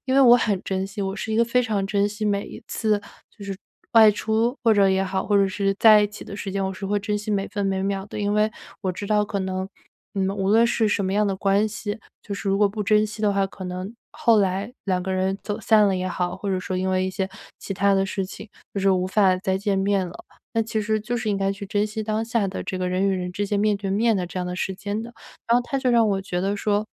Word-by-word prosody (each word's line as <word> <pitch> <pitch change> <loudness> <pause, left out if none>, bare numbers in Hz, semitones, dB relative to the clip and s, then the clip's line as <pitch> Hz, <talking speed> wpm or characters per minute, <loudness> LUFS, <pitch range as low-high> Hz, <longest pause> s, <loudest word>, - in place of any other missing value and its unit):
因 260 - +1
为 275 - +6
我 245 -2 +8
很 205 -5 0
珍 190 0 -2
惜， 200 +1 -5
我 195 0 -2
是 220 - -5
一 220 - +1
个 235 - +4
非 250 +2 +2
常 205 -4 -1
珍 200 0 +1
惜 210 +1 -5
每 200 -1 0
一 - - -10
次， 215 -2 0 0.4
就 205 - -10
是 195 -1 -5 0.4
外 220 -2 +8
出 220 +5 0
或 225 - +6
者 200 -2 +4
也 190 0 +2
好， 190 0 -2
或 205 - +3
者 200 -1 +4
是 195 +1 0
在 215 -2 +8
一 210 - +3
起 210 - -10
的 200 - -8
时 200 - -5
间， 195 0 -1
我 190 - -2
是 195 +1 -6
会 205 +1 +1
珍 210 +1 -2
惜 210 +1 -5
每 200 -1 0
分 205 0 -3
每 190 -1 0
秒 195 0 -2
的。 - - -7
因 205 0 0
为， 210 +1 +2 0.3
我 190 -2 -1
知 200 +3 -6
道 210 0 +2
可 200 -1 -3
能 190 0 -3 0.5
嗯， 195 -1 0
无 195 0 -1
论 225 +3 +5
是 225 -2 +1
什 200 -1 0
么 190 - -1
样 210 +1 +2
的 195 -1 -1
关 200 +2 +2
系， 210 +1 -5 0.2
就 200 - -5
是 200 - -4
如 195 - +2
果 205 - +5
不 210 +1 -4
珍 215 +1 +3
惜 215 +1 -9
的 205 - +3
话， 195 -1 +1
可 190 0 -10
能 185 +3 -5 0.2
后 230 -2 +3
来 195 +3 0
两 185 -2 0
个 190 0 -2
人 190 +1 0
走 205 +1 -4
散 215 -2 +5
了 195 - +2
也 185 0 -2
好， 180 0 -2
或 200 - -5
者 185 - 0
说 185 - -3
因 185 +1 0
为 185 0 +1
一 - - -2
些 190 0 -2 0.3
其 195 - -5
他 200 +2 +3
的 195 0 +2
事 195 0 -2
情， 200 +3 -10 0.3
就 200 - -1
是 195 0 +3
无 185 -1 +2
法 190 -1 +3
再 190 0 -1
见 200 -1 0
面 195 -1 +1
了。 175 - -12 0.3
那 225 - +1
其 220 0 -2
实 215 +1 0
就 240 +3 -3
是 220 -2 -2
应 200 - 0
该 195 0 0
去 200 +1 -8
珍 205 +1 +1
惜 215 +1 -4
当 215 +1 -1
下 225 -3 0
的 190 - -5
这 185 - -3
个 180 - -1
人 185 +2 +1
与 - - +2
人 180 -1 -3
之 205 +2 -2
间 205 0 0
面 210 0 +2
对 200 0 -5
面 220 +2 +2
的 180 - -2
这 180 - -6
样 180 - -2
的 180 - -4
时 190 0 -2
间 205 +2 -4
的。 235 +1 -9 0.3
然 235 - +4
后 245 - +3
他 275 +2 -2
就 255 -2 +1
让 230 -2 +4
我 195 -1 0
觉 180 -2 -3
得 195 +2 0
说， 205 0 0
200 Hz, 315 characters per minute, -24 LUFS, 190-215 Hz, 0.5 s, 我